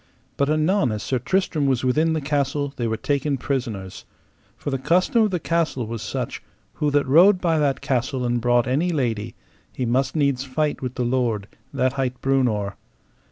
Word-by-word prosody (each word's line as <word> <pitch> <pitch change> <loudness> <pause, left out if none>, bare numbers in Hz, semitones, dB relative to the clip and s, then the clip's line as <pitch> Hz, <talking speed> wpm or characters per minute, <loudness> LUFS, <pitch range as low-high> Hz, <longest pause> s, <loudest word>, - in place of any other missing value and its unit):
But 140 +2 +1
anon 155 - +2
as 105 -1 -4
Sir 130 - -1
Tristram 165 -2 0
was 130 -2 +1
within 155 +6 +2
the 160 - -1
castle 140 0 -1
they 120 -3 -2
were 110 0 -1
taken 140 +3 -1
prisoners; 115 -10 -4 0.5
for 145 - -4
the 135 - -1
custom 180 - +2
of 215 - +3
the 180 -2 -1
castle 165 -7 -1
was 115 0 -5
such; 105 - -4 0.3
who 150 - 0
that 145 0 +2
rode 180 +8 +6
by 165 -3 +1
that 140 -3 +1
castle 130 -1 -1
and 120 0 0
brought 120 0 +3
any 145 +8 +1
lady, 115 -8 -2 0.4
he 130 - -3
must 130 +4 0
needs 140 -4 +1
fight 145 +3 -1
with 125 -1 -4
the 125 - -1
lord, 120 -5 0 0.2
that 130 0 0
hight 130 -2 -2
Breunor. 120 -7 0
135 Hz, 185 wpm, -23 LUFS, 120-150 Hz, 0.5 s, rode